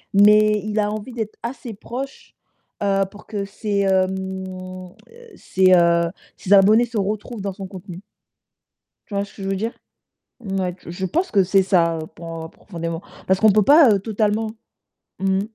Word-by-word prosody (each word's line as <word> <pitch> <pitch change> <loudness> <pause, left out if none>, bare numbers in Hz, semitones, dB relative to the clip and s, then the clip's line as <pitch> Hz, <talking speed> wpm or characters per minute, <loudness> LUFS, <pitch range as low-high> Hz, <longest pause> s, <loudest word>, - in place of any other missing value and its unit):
mais 210 +1 +6
il 215 0 -1
a 210 0 +1
envie 215 +4 -6
d'être 220 -3 -5
assez 235 -1 -6
proche, 260 +6 -7 0.5
heu, 195 -1 +2
pour 210 - -15
que 205 -2 -3
ses, 200 0 -2
heu, 190 -1 +3
mmh, 185 -1 -6 0.5
ses, 185 -1 +3
heu, 170 -1 +4 0.3
ses 190 - -7
abonnés 210 +4 +6
se 230 -2 -6
retrouvent 210 +2 -3
dans 195 -1 -3
son 195 0 -7
contenu 185 -1 -10 1.1
tu 205 - -8
vois 200 0 0
ce - - -16
que 200 - -10
je 195 - -3
veux 195 - 0
dire? 225 +4 -2 0.7
Ouais, 190 -5 -3
je 175 +3 -4
pense 350 - -1
que 195 -2 +4
c'est 190 +1 +3
ça 170 -3 +2 0.2
pour, 165 -1 -7
heu, 160 - -9
profondément. 165 -2 -6 0.3
Parce 190 0 +3
qu'on 220 +1 +6
ne - - +4
peut 210 0 +4
pas, 290 -3 +7
heu, 200 - +3
totalement 215 +1 -1 0.7
mmh. 190 0 +1
195 Hz, 180 wpm, -21 LUFS, 185-215 Hz, 1.1 s, pas